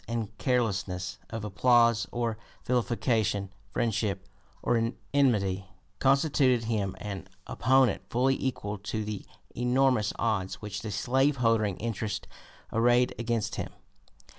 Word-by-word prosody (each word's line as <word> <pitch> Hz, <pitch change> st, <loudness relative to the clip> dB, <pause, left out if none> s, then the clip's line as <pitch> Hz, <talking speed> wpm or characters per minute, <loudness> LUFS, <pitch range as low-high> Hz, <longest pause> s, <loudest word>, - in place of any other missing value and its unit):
246) 115 Hz, -3 st, -2 dB
and -, -, -33 dB
carelessness 95 Hz, -7 st, 0 dB
of 110 Hz, -1 st, -5 dB
applause 115 Hz, +2 st, +4 dB
or 120 Hz, -2 st, -1 dB, 0.3 s
vilification, 115 Hz, -5 st, 0 dB, 0.2 s
friendship 100 Hz, -3 st, -1 dB, 0.4 s
or 115 Hz, 0 st, +1 dB, 0.2 s
enmity, 100 Hz, -9 st, +2 dB, 0.3 s
constituted 135 Hz, -3 st, +3 dB
him 105 Hz, -4 st, -1 dB
an 95 Hz, -3 st, -6 dB, 0.2 s
opponent 130 Hz, +1 st, +3 dB
fully 130 Hz, +3 st, +2 dB
equal 105 Hz, -6 st, -2 dB
to 105 Hz, +2 st, -3 dB
the 105 Hz, -2 st, -4 dB, 0.3 s
enormous 125 Hz, -3 st, +2 dB
odds 100 Hz, -5 st, 0 dB
which 105 Hz, -2 st, -6 dB
the 110 Hz, -, -5 dB
slave 130 Hz, +8 st, +2 dB
holding 110 Hz, -5 st, +2 dB
interest 110 Hz, -1 st, -3 dB, 0.5 s
arrayed 120 Hz, +2 st, +4 dB
against 115 Hz, -2 st, -1 dB
him. -, -, -3 dB
115 Hz, 115 wpm, -29 LUFS, 100-125 Hz, 0.5 s, applause